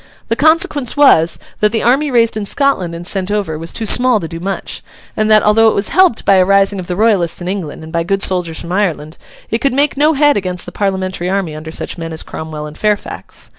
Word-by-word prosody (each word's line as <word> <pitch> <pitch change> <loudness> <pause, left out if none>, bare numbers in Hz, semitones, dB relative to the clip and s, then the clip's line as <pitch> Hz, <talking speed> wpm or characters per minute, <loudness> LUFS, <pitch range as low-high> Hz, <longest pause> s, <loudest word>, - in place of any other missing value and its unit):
The 230 - +1
consequence 295 -3 +2
was, 170 - +4 0.2
that 210 0 +3
the 225 - -1
army 275 +5 +2
raised 230 -3 +2
in 210 -2 -4
Scotland 190 -13 0
and 170 +1 -8
sent 190 0 -3
over, 205 -6 -2
was 165 +1 -4
too 225 - -3
small 245 +1 +3
to 165 - -5
do 165 0 -7
much; 195 +3 -4 0.3
and 215 0 0
that, 215 -1 +5
although 220 +2 +4
it - - -1
was 200 - -1
helped 375 -11 +3
by 195 - +5
a 185 - +5
rising 195 +1 +2
of 180 - -7
the 180 - -3
Royalists 195 -5 +1
in 175 - -6
England 180 -6 -5
and 160 +1 -11
by 170 - +1
good 195 +3 -1
soldiers 180 -3 -1
from 170 - -8
Ireland, 165 -5 -2 0.3
it 225 - 0
could 275 -1 +1
make 285 +2 +1
no 305 +3 +4
head 290 -2 +3
against 180 -2 -3
the - - -8
Parliamentary 190 -3 -2
army 190 -5 -1
under 155 +1 -8
such 170 - -5
men 165 0 -5
as 160 - -5
Cromwell 155 -1 -7
and 150 0 -10
Fairfax. 210 -1 -3
195 Hz, 240 wpm, -15 LUFS, 170-225 Hz, 0.3 s, that